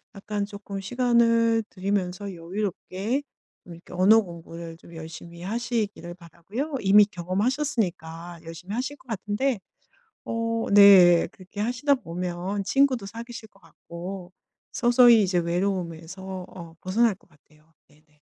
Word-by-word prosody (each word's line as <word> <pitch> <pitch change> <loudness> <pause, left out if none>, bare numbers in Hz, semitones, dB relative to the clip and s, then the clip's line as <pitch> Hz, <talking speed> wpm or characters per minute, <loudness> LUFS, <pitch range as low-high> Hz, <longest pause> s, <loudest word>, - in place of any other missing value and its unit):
약간 205 0 -3
쪼끔 200 -1 -7
시간을 230 0 +2
들이면서 195 0 -2
여유롭게 195 +6 -3 0.4
이렇게 170 0 -12
언어 205 +5 +6
공부를 170 -2 -9
좀 170 0 -15
열심히 165 +1 -9
하시기를 215 -4 -3
바라고요. 195 - -6
이미 205 +1 +7
경험하셨으니까 180 - -2
열심히 175 +5 -7
하실 260 +4 -3
것 255 - -24
같은데. 220 +3 -1 0.7
어 230 0 -2 0.2
네 190 -4 +8
그렇게 185 +2 -12
하시다 255 +5 +2
보면 180 0 -4
친구도 255 -3 +2
사귀실 230 +1 -8
것 195 -1 -26
같고 180 +1 -9 0.4
서서히 240 -2 +6
이제 180 -2 +1
외로움에서 180 +1 -3
어 170 -2 -11
벗어날 215 +3 +2
것 - - -28
같아요. 155 +1 -27
네네. 150 0 -28
195 Hz, 300 characters per minute, -25 LUFS, 175-230 Hz, 0.7 s, 네